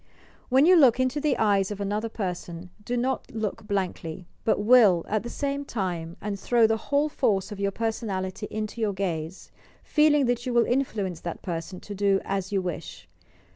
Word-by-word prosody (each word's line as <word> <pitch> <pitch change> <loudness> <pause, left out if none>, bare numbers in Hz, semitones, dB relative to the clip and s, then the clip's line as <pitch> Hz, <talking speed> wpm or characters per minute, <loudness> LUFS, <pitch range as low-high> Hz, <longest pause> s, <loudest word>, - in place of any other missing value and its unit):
When 265 +3 +5
you 365 +2 +7
look 265 -7 +6
into 255 +3 0
the 295 -3 +1
eyes 200 -3 +2
of 205 -1 -5
another 210 +3 -2
person, 180 -4 -5
do 245 +3 -2
not 260 +2 -1
look 215 -2 -4
blankly, 185 -4 -3 0.2
but 220 - +2
will 210 -6 +5
at 215 -1 0
the 240 - -7
same 280 +1 -2
time, 175 -9 -4
and 205 -1 -3
tbrow 230 +3 +3
the 225 - +2
whole 285 +1 +3
force 215 -9 0
of 205 - -7
your 200 0 +1
personality 205 -2 -3
into 215 +2 -4
your 210 -2 +1
gaze,— 175 -2 -4 0.3
feeling 300 -2 +4
that 240 -1 0
you 250 - -3
wiil 235 - +5
influence 215 -9 -1
that 170 0 -6
person 175 +1 -5
to 205 - -8
do 200 -1 +2
as 195 -1 -2
you 195 -2 0
wish. 175 -3 -6
210 Hz, 185 wpm, -26 LUFS, 190-245 Hz, 0.3 s, you